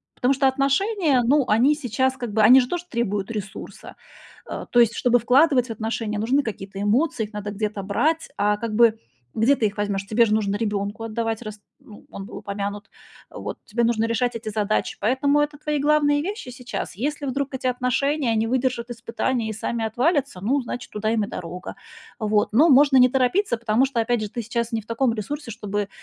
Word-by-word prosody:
Потому 250 +2 +2
что 270 0 +2
отношения, 275 - +2
ну, 275 +3 +3
они 245 +8 +4
сейчас 260 -1 -1
как 240 -4 -5
бы 215 +1 +1
они 245 +5 +8
же 250 - -3
тоже 350 -1 -3
требуют 205 -4 -2
ресурса. 210 -3 -7 0.5
Э, - - -5
то 240 - +4
есть 235 -1 +4
чтобы 245 0 +3
вкладывать 255 +2 +4
в - - -6
отношения, 220 -1 -3
нужны 250 +7 +2
какие-то 195 -3 -6
эмоции, 235 +4 +1
их 210 - -15
надо 210 0 -5
где-то 210 -1 -3
брать. 310 +12 0
А 210 0 +2
как 225 0 -4
бы, 230 -1 +5 0.4
где 235 +6 +4
ты 225 - +1
их 205 0 -1
возьмёшь? 200 -1 -2
Тебе 225 +3 +4
же 215 - 0
нужно 205 -2 0
ребёнку 205 0 -2
отдавать, 225 0 -3
раз, 215 -2 -8 0.2
ну, 210 - -15
был 195 0 -8
упомянут, 205 +1 -5 0.4
э, - - -16
вот, - - -6
тебе 235 +2 -1
нужно 230 -1 +1
решать 240 +2 0
эти 225 - -12
задачи. 215 0 -1
Поэтому 275 +7 +2
это 295 0 -2
твои 300 0 -2
главные 290 0 +3
вещи 395 - -5
сейчас. 250 -6 -6
Если 285 +7 -3
вдруг 275 +1 -2
эти 260 -1 -2
отношения 255 +1 0
не 220 +1 +1
выдержат 250 -1 -1
испытания 230 0 -2
и - - -3
сами 225 +2 -3
отвалятся, 270 - 0
ну, 265 +8 +1
значит, 245 0 -6
туда 210 +1 -2
им 220 -2 +1
и - - -11
дорога. 180 0 -7 0.4
Вот, 210 -2 0
но 300 +9 +5
можно 280 0 +6
не 255 -1 +7
торопиться, 260 - +1
потому 230 +2 +2
что, 265 -3 -2
опять 235 0 +1
же, 215 - -2
ты 235 - -4
сейчас 235 +1 -3
не 225 - -1
в - - -23
таком 230 +1 +1
ресурсе, 235 +5 -5
чтобы 205 -2 -3
235 Hz, 205 wpm, -23 LUFS, 215-265 Hz, 0.5 s, они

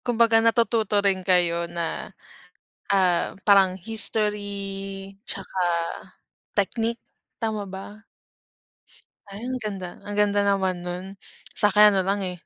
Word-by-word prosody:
Kumbaga 230 -2 +4
natututo 230 -2 +2
rin 190 -1 +2
kayo 175 -2 +1
na, 170 -1 -4 0.8
ah, 185 -3 +2
parang 195 -3 +5
history 200 -2 0 0.2
tsaka 190 -1 -4 1.0
technique, 225 +3 0 0.4
tama 215 -3 -3
ba? 200 +3 -10 1.3
Ay 200 +2 -8
ang 255 0 -2
ganda, 195 -4 -5
ang 205 - -7
ganda 205 0 +3
naman 190 -3 0
nun. 180 +1 -5 0.5
Sakin 210 0 +5
ano 195 - +2
lang, 195 +2 0
eh, 180 -2 -6
200 Hz, 110 wpm, -24 LUFS, 185-215 Hz, 1.3 s, parang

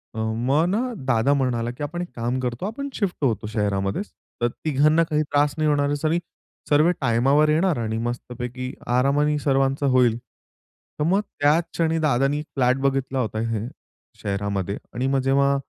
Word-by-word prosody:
अ, - - -4
मग 120 +8 +1
ना 210 +4 +1 0.3
दादा 130 +2 +3
म्हणाला 120 -3 0
की, 135 +4 -7
"आपण 175 +4 -4
एक 175 - -4
काम 120 +2 -1
करतो, 125 +7 -3
आपण 280 +7 -4
शिफ्ट 200 -4 -1
होतो 115 -4 0
शहरामध्येच, 105 - -1 0.3
तर 120 - +3 0.2
तिघांना 155 +3 +4
काही 150 0 +2
त्रास 145 0 +1
नाही 155 -1 +2
होणार 145 -1 +2
असं 155 +2 0
वी 170 +2 +2 0.5
सर्वे 155 +4 +5
टाइमावर 135 +6 +3
येणार 165 0 +2
आणि 110 -1 -2
मस्तपैकी 125 +1 -5 0.2
आरामाने 145 +3 +2
सर्वांचं 135 0 +1
होईल." 125 -3 +3 0.8
तर - - +1
मग 195 +3 +3 0.2
त्याच 150 +4 +4
क्षणी 165 -1 +1
दादांनी 145 0 +1
फ्लॅट 125 0 +3
बघितला 135 -1 0
होता 110 -2 -2
हे 110 +1 -2 0.5
शहरामध्ये 100 -1 -2 0.2
आणि 130 +3 -1
मग 135 0 +2
जेव्हा 140 0 +3
135 Hz, 165 wpm, -23 LUFS, 120-150 Hz, 0.8 s, सर्वे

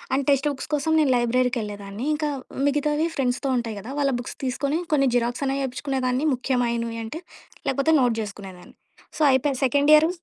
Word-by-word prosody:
And 275 - 0
text 275 +1 +3
books 265 - -7
కోసం 300 +2 +1
నేను 290 -4 +3
లైబ్రరీకెళ్ళేదాన్ని 230 -3 -1
ఇంకా 300 0 -1 0.4
మిగతావి 295 +2 +1
ఫ్రెండ్స్‌తో 260 +1 -1
ఉంటాయి 230 -3 -3
కదా 225 +6 -8
వాళ్ళ 275 -1 +2
బుక్స్ 245 - -7
తీసుకొని 280 +5 -1
కొన్ని 275 -3 +3
జిరాక్స్ 245 +3 0
అనేవి 275 +1 -1
చేపించుకునేదాన్ని 260 +1 -1
ముఖ్యమైనవి 235 -3 -1
అంటే 310 +10 -6 0.5
లేకపోతే 275 +4 +2
నోట్ 240 -2 +2
చేసుకునేదాన్ని. 195 -3 -9 0.4
So, - - -4
అయిపోయక 265 +1 +1
second 285 +3 +3
year 315 +2 +5
260 Hz, 160 wpm, -24 LUFS, 235-285 Hz, 0.5 s, year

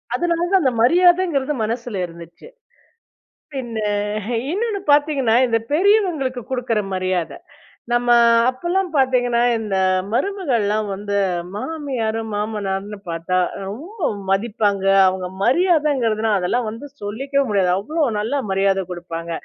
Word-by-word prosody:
அதனால 335 +3 0
தான் 385 -1 +4
அந்த 260 -2 +2
மரியாதைங்கிறது 345 -2 +3
மனசுல 230 0 -3
இருந்துச்சு. 170 - -13 1.1
பின்ன 240 -4 -5 0.7
இன்னொன்னு 420 +2 -1
பார்த்தீங்கன்னா, 285 -5 +3
இந்த 230 -1 +2
பெரியவங்களுக்கு 325 - +2
கொடுக்குற 245 -4 -1
மரியாதை. 185 - -2 0.6
நம்ம 240 0 +1 0.4
அப்பல்லாம் 350 +9 -1
பார்த்தீங்கன்னா 245 -3 +2 0.2
இந்த 210 -3 -3 0.4
மருமகள்லாம் 235 - 0
வந்து 200 +1 -5 0.4
மாமியார் 250 -4 -3 0.2
மாமனார்ன்னு 205 -1 -3
பார்த்தா 165 +2 -1 0.3
ரொம்ப 320 - -4 0.2
மதிப்பாங்க. 200 -1 0 0.2
அவங்க 185 -1 -1 0.2
மரியாதைங்கிறதுனா 265 - +2
அதெல்லாம் 225 +7 -1
வந்து 230 +6 -8 0.2
சொல்லிக்கவே 270 +7 -1
முடியாது. 195 -3 +2
அவ்ளோ 305 +11 -2 0.2
நல்லா 230 +7 -1
மரியாத 195 0 +2
கொடுப்பாங்க. 170 -1 -6
240 Hz, 105 wpm, -20 LUFS, 205-295 Hz, 1.1 s, தான்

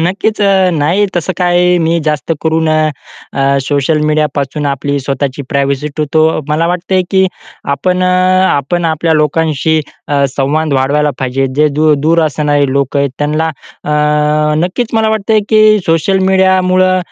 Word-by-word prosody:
नक्कीच 195 +6 -1
अ, 190 -2 +3
नाही 165 +7 +1
तसं 175 +2 -1
काय 180 0 +2
मी 165 +1 +1
जास्त 150 +2 -1
करून 160 0 0
अ, 155 0 +1 0.4
अ, 140 0 +1
सोशल 145 +2 0
मीडियापासून 150 -1 -1
आपली 140 +1 -2
स्वतःची 140 +1 -3
प्रायव्हसी 140 +1 -1
ठेवतो. 155 +1 +1
मला 160 +2 0
वाटतंय 180 +1 0
की 190 -1 +3 0.5
आपण 185 +3 -1
अ, - - +2 0.4
आपण 165 +5 -1
आपल्या 160 0 0
लोकांशी 155 0 +1 0.3
अ, 140 -1 +1
संवाद 150 +2 0
वाढवायला 145 +3 +1
पाहिजे. 135 +1 -1
जे 150 +1 +3
दूर 155 -1 +4
दूर 165 +2 +2
असणारे 145 -1 0
लोकं 140 +1 0
आहेत 140 -1 0
त्यांना 155 +2 -1 0.4
अ, 150 0 +1
नक्कीच 225 +6 -3
मला 220 -1 +2
वाटतंय 220 0 +1
की 215 -1 +4 0.2
सोशल 165 +4 +1
मीडियामुळं 185 -1 +2
155 Hz, 145 wpm, -12 LUFS, 145-180 Hz, 0.5 s, दूर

